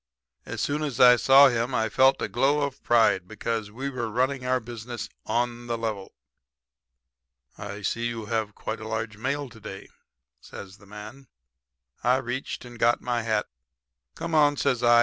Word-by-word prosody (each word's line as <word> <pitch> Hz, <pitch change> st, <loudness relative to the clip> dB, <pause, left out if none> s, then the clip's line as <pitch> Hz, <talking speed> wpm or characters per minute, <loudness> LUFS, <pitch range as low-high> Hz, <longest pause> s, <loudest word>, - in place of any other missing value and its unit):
As -, -, -4 dB
soon 145 Hz, +1 st, -1 dB
as 145 Hz, -6 st, -3 dB
I 125 Hz, -1 st, +9 dB
saw 135 Hz, +3 st, +7 dB
him 120 Hz, +1 st, -1 dB
I 110 Hz, -2 st, +1 dB
felt 130 Hz, +5 st, +3 dB
a -, -, 0 dB
glow 145 Hz, +2 st, +2 dB
of 140 Hz, -2 st, -3 dB
pride, 110 Hz, -6 st, +3 dB
because 110 Hz, +1 st, -3 dB
we 130 Hz, +6 st, -5 dB
were 125 Hz, -4 st, -3 dB
running 130 Hz, +4 st, 0 dB
our 130 Hz, 0 st, +1 dB
business 120 Hz, 0 st, -7 dB, 0.2 s
on 120 Hz, 0 st, -1 dB
the 120 Hz, 0 st, -1 dB
level. 110 Hz, -4 st, -4 dB, 1.4 s
"'I 100 Hz, 0 st, -7 dB
see 115 Hz, +4 st, -1 dB
you 115 Hz, -2 st, -5 dB
have 110 Hz, -2 st, -2 dB
quite 110 Hz, -, -5 dB
a 110 Hz, -, -7 dB
large 110 Hz, -1 st, -3 dB
mail 140 Hz, +5 st, -2 dB
to 115 Hz, -, -15 dB
day,' 100 Hz, -2 st, -9 dB, 0.5 s
says 100 Hz, 0 st, -11 dB
the 100 Hz, -, -18 dB
man. 105 Hz, +6 st, -10 dB, 0.8 s
"I 125 Hz, +2 st, +4 dB
reached 130 Hz, 0 st, -4 dB
and 120 Hz, -1 st, -12 dB
got 120 Hz, +1 st, +3 dB
my 120 Hz, -1 st, -1 dB
hat. 110 Hz, -2 st, 0 dB, 0.7 s
"'Come 165 Hz, -1 st, -5 dB
on,' 145 Hz, -2 st, +4 dB
says 135 Hz, -4 st, +1 dB
I. 120 Hz, -1 st, +6 dB
120 Hz, 175 wpm, -26 LUFS, 110-130 Hz, 1.4 s, I